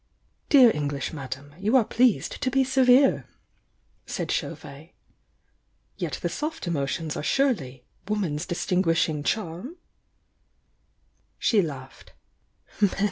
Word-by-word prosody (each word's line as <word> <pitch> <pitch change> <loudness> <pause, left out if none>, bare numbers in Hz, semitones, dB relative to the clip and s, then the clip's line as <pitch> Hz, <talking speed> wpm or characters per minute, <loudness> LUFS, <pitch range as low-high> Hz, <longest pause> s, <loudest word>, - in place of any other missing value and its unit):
"Dear 255 -5 +7
English 145 -1 -3
madame, 140 -1 -7
you 215 +6 +1
are 235 - +3
pleased 245 -1 +1
to 255 - +1
be 270 +1 +3
se 265 0 +2
vere!" 255 +2 +5 0.8
said - - -3
Chauvet. - - -5 1.0
"Yet - - -4
the - - +1
soft 315 -2 -4
emotions 155 -1 -2
are - - -3
surely 145 - 0 0.2
'woman's 185 -8 -2
distinguishing 165 -3 +1
charm'?" 210 - -3 1.6
She 215 -4 +3
laughed. 135 -6 -8
180 Hz, 105 wpm, -25 LUFS, -, 1.6 s, Dear